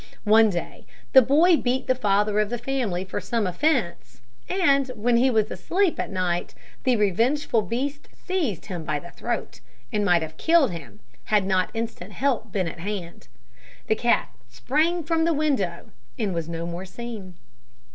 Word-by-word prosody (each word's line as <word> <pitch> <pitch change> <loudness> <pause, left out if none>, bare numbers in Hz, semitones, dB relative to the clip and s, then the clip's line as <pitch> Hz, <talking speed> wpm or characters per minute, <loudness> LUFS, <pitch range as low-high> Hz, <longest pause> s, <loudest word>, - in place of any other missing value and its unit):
One 220 +1 +6
day 175 -3 -5 0.3
the 265 - +10
boy 310 +8 +5
beat 255 0 -1
the 255 - +3
father 210 -3 +1
of 210 -1 +1
the 240 - -2
family 240 -8 -2
for 190 - -4
some 230 -3 -1
offence, 210 - -1 0.3
and 280 -8 +3
when 235 +2 +2
he 255 +3 +4
was 220 -3 +1
asleep 375 -1 0
at - - -2
night 180 -2 -2 0.3
the 255 -2 +4
revengeful 225 +5 +2
beast 270 +8 -3
seized 320 - -2
him 175 -5 -5
by 150 - -1
the 175 +4 -9
throat, 235 - -4 0.3
and 210 - +1
might 175 -4 +3
have 160 0 -8
killed 320 - +4
him 135 -12 -9 0.2
had 210 -3 +2
not 185 -1 +1
instant 225 -4 -5
help 255 -6 -1
been 185 -3 -1
at 165 - -7
hand. 185 -2 -6 0.6
The 220 - +2
cat 235 +2 +1 0.2
sprang 305 - 0
from 325 +1 +1
the 335 0 +2
window 260 - -1 0.3
and 200 -4 -1
was 165 -1 -3
no 165 0 -4
more 175 +2 -5
seen. 200 -2 -8
220 Hz, 170 wpm, -24 LUFS, 180-270 Hz, 0.6 s, the